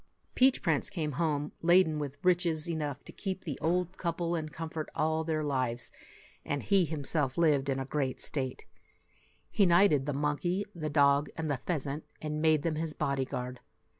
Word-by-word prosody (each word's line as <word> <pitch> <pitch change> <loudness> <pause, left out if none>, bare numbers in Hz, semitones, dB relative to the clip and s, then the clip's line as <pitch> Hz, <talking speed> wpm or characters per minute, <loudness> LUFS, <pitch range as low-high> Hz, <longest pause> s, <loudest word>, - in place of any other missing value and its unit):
Peach 260 0 +4
Prince 160 -6 +1
came 160 -6 -2
home 150 0 -1
laden 170 -2 +4
with 145 -1 -4
riches 175 -4 +2
enough 150 -4 -3
to - - -9
keep 190 -2 -4
the 150 -7 -5
old 180 +2 0
couple 170 0 -1
in 155 -2 -3
comfort 160 +1 -5
all 160 +1 +1
their 155 -1 -1
lives, 130 -4 -1 0.5
and 145 -1 -2
he 195 -3 +4
himself 150 -3 -1
lived 145 -5 +3
in 135 - +1
great 135 -1 -2
state. 130 -3 -4 0.9
He 200 - +4
knighted 170 -6 +4
the 145 - 0
monkey, 150 +7 0
the 155 -3 -4
dog, 145 0 +4
and 160 -2 -1
the 135 - -2
pheasant, 150 -3 -2 0.2
and 150 0 -3
made 155 -2 +3
them 160 -2 -1
his 160 -1 -2
body 140 -1 0
guard. 125 0 -5
155 Hz, 170 wpm, -31 LUFS, 140-170 Hz, 0.9 s, Peach